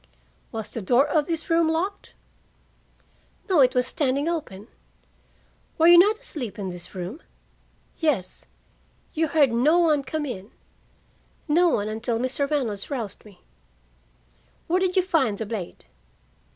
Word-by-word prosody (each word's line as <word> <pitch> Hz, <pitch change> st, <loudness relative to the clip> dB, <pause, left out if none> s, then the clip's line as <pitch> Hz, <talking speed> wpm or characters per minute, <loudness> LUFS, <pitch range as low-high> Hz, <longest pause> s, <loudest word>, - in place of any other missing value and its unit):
"Was 220 Hz, -2 st, -6 dB
the 230 Hz, -, -5 dB
door 245 Hz, +8 st, +3 dB
of 295 Hz, 0 st, +1 dB
this 330 Hz, -2 st, -3 dB
room 330 Hz, -2 st, +3 dB
locked?" 365 Hz, +5 st, -3 dB, 1.3 s
"No. 370 Hz, -6 st, +3 dB
It 255 Hz, -1 st, +5 dB
was 250 Hz, 0 st, +2 dB
standing 280 Hz, +1 st, -1 dB
open." 230 Hz, -, -4 dB, 1.1 s
"Were 325 Hz, -, +3 dB
you 345 Hz, 0 st, +9 dB
not 420 Hz, +4 st, +5 dB
asleep 250 Hz, -, -7 dB
in 195 Hz, -2 st, -4 dB
this 175 Hz, +1 st, -9 dB
room?" 185 Hz, -, -6 dB, 0.8 s
"Yes." 275 Hz, -, -1 dB, 0.7 s
"You 320 Hz, +1 st, +1 dB
heard 290 Hz, -4 st, +3 dB
no 270 Hz, +9 st, +3 dB
one 315 Hz, -4 st, +3 dB
come 295 Hz, +3 st, -3 dB
in?" 205 Hz, -6 st, -6 dB, 1.0 s
"No 340 Hz, +3 st, +4 dB
one 205 Hz, -8 st, 0 dB
until 225 Hz, +2 st, -2 dB
Mr. 260 Hz, +3 st, -1 dB
Reynolds 235 Hz, -10 st, -2 dB
roused 230 Hz, -8 st, -5 dB
me." 200 Hz, -4 st, -17 dB, 1.2 s
"Where 360 Hz, +2 st, +1 dB
did 370 Hz, -1 st, 0 dB
you 375 Hz, -, +4 dB
find 275 Hz, -, +1 dB
the 220 Hz, -, -4 dB
blade?" 205 Hz, -5 st, -6 dB
275 Hz, 140 wpm, -24 LUFS, 220-325 Hz, 1.3 s, you